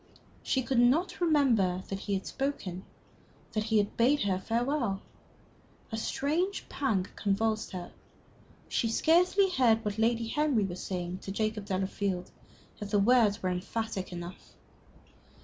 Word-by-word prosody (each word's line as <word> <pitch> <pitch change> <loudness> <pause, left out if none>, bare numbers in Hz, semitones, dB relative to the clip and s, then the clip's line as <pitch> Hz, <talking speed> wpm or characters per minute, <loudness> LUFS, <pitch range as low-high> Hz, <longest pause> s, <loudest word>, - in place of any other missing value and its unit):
She 260 - 0
could 260 -1 +1
not 280 +11 +3
remember 235 - +3
that 195 - -3
he 200 0 -2
had 190 - -3
spoken 200 -10 -3 0.7
that 215 -1 -1
he 220 -1 +2
had 205 -1 +1
bade 260 +4 +3
her 190 -2 0
farewell. 235 0 0 0.9
A 220 - -2
strange 320 - -1
pang 215 -10 0
convulsed 215 +2 0
her. 180 -1 -6 0.8
She 230 - 0
scarcely 360 - +3
heard 230 -8 +3
what 210 +1 -2
Lady 230 +1 +2
Henry 285 -3 +1
was 180 -2 -4
saying 180 -1 -4
to 195 - -7
Jacob 215 0 -2
Delafield. 190 -1 -2 0.5
Yet 205 - -4
the 205 - +2
words 210 -1 +4
were 185 - +1
emphatic 190 +1 -3
enough. 175 +1 -8
220 Hz, 140 wpm, -30 LUFS, 195-260 Hz, 0.9 s, words